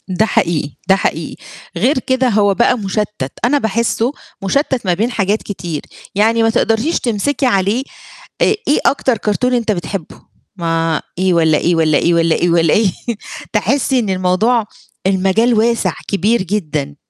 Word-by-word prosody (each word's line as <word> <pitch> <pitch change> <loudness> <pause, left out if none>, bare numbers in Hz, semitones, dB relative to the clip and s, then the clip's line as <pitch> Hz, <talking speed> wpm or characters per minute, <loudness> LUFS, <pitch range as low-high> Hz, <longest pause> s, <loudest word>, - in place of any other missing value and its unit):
ده 185 +3 +1
حقيقي، 170 -10 0 0.2
ده 190 - +7
حقيقي، 165 -4 -2 0.4
غير 255 - +2
كده 260 0 +1
هو 205 -2 +3
بقى 240 +4 +2
مشتِّت، 200 - -3
أنا 280 +4 +3
باحسّه 230 +1 0 0.3
مشتِّت 260 +3 0
ما 180 - +2
بين 220 +8 -1
حاجات 205 -1 0
كتير 175 -6 -5 0.3
يعني، 225 +3 +3
ما 225 - +3
تقدريش 225 +7 +1
تمسكي 250 +5 -1
عليه 205 +2 +1 0.6
آآ، - - +6 0.2
إيه 290 - +3
أكتر 260 -3 +2
كرتون 215 +5 0
أنت 235 -3 +1
بتحبّه؟ 180 -2 -5 0.3
ما 165 -3 -1 0.2
إيه 185 0 +2
والّا 160 -2 +3
إيه، 170 +3 +1
والّا 155 -2 +3
إيه، 170 - +2
والّا 165 -1 +2
إيه 175 - +1
والّا 165 -2 +3
إيه، 210 -4 +3 0.6
تحسّي 260 +4 +1
إن 220 -4 -2
الموضوع 190 +5 +1 0.4
المجال 195 +5 +2
واسع، 230 +1 +1
كبير 210 +4 +1
جدًا. 155 -7 -3
205 Hz, 155 wpm, -16 LUFS, 175-235 Hz, 0.6 s, ده